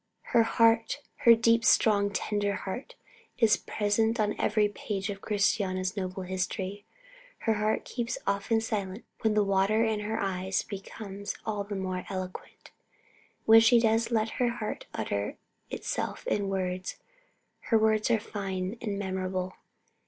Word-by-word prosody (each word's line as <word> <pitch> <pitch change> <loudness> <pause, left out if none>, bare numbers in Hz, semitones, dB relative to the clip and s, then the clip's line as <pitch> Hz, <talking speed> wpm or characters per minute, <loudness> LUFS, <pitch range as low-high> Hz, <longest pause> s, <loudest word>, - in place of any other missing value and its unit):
Her 235 - +7
heart, 225 +2 +3 0.3
her 230 - +11
deep, 230 0 +3
strong, 200 -3 +4
tender 205 0 -1
heart, 200 +7 -6 0.4
is 225 -3 +5
present 220 +2 0
on 210 -1 +2
every 210 0 +3
page 205 0 -4
of 195 0 -8
Christiana's 195 -2 0
noble 185 -1 -3
history. 190 +2 -3 0.6
Her 225 - +2
heart 215 +1 0
keeps 240 0 -3
her - - -11
often 200 +3 +1
silent 205 -2 -3
when 220 -1 +1
the 210 - +4
water 200 +3 +2
in 220 -1 0
her 215 +2 -2
eyes 190 -1 -1
becomes 200 0 -7
all 210 -2 -2
the 205 0 -5
more 185 -1 -3
eloquent. 185 -1 -7 0.7
When 225 0 +9
she 230 +1 +6
does 225 0 +2
let 225 -1 +1
her 245 - +4
heart 235 -3 -5
utter 100 -1 -3 0.3
itself - - -3
in 200 -1 0
words, 185 -1 -2 0.7
her 225 - +4
words 220 0 +2
are 230 -2 +3
fine 195 0 -4
and 205 -3 -2
memorable. 185 -1 -2
205 Hz, 145 wpm, -29 LUFS, 190-225 Hz, 0.7 s, her